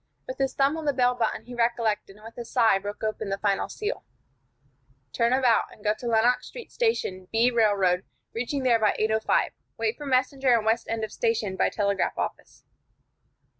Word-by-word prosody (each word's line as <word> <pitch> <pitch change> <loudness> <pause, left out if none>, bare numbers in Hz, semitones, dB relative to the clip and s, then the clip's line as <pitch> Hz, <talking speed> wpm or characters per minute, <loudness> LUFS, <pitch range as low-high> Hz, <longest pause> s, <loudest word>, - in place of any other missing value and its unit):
With 255 - -7
his 270 -1 0
thumb 280 +3 +2
on 320 - -6
the 285 - +2
bell 250 -1 +3
button 235 -3 -2
he 245 - -10
recollected, 230 -4 0
and 210 +1 -17
with 230 - -11
a 240 - -6
sigh 230 -4 +3
broke 205 +2 -7
open 215 -1 -2
the 195 - -1
final 200 -1 0
seal: 435 +3 -4 1.1
"Turn 235 0 +2
about, 255 -3 +3
and 210 - -17
go 210 -1 +2
to 245 - -5
Lenox 235 +2 +2
Street 485 - -10
Station, 320 - -1
B. 230 +2 +3
Railroad, 200 -6 +2 0.3
reaching 250 +4 -2
there 240 -3 +4
by 215 -2 +2
8:05. 220 0 +1 0.3
Wait 440 - -1
for 295 - -7
messenger 260 -1 +2
in 220 - -3
west 225 +1 +1
end 225 -1 -2
of 215 - -4
station, 225 -4 -1
by - - +2
telegraph 200 -2 -1
office." - - -5
230 Hz, 190 wpm, -26 LUFS, 215-255 Hz, 1.1 s, there